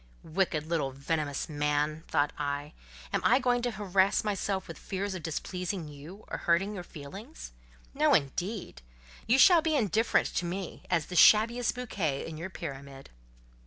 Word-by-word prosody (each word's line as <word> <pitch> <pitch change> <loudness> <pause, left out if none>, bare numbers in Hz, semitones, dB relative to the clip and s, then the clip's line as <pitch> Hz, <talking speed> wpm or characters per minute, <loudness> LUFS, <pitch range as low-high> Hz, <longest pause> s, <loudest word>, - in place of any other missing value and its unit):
"Little 155 - -14 0.6
wicked - - -15
venomous 150 -3 -1
man!" 150 +1 -1
thought 145 +1 +1
I; 145 0 -3 0.4
"am - - +1
I - - +5
going 245 -2 +1
to 245 - 0
harass 200 -3 +1
myself 200 -2 -2
with - - -9
fears 195 +1 -3
of 185 - -5
displeasing 180 +2 -4
you, 150 +8 -11
or - - -5
hurting 185 +5 +1
your 185 -4 -6
feelings? 190 - -10 0.4
No, - - +4
indeed; 175 - -2 0.5
you 240 +4 +4
shall 340 +4 +7
be 315 -1 +1
indifferent 225 - +2
to 180 - 0
me, 180 +1 -5
as 170 -4 +1
the 180 - -7
shabbiest 225 +7 +5
bouquet 190 - -2
in 160 - -7
your 170 +4 -6
pyramid." 140 -6 -8
180 Hz, 160 wpm, -29 LUFS, 150-210 Hz, 0.6 s, shall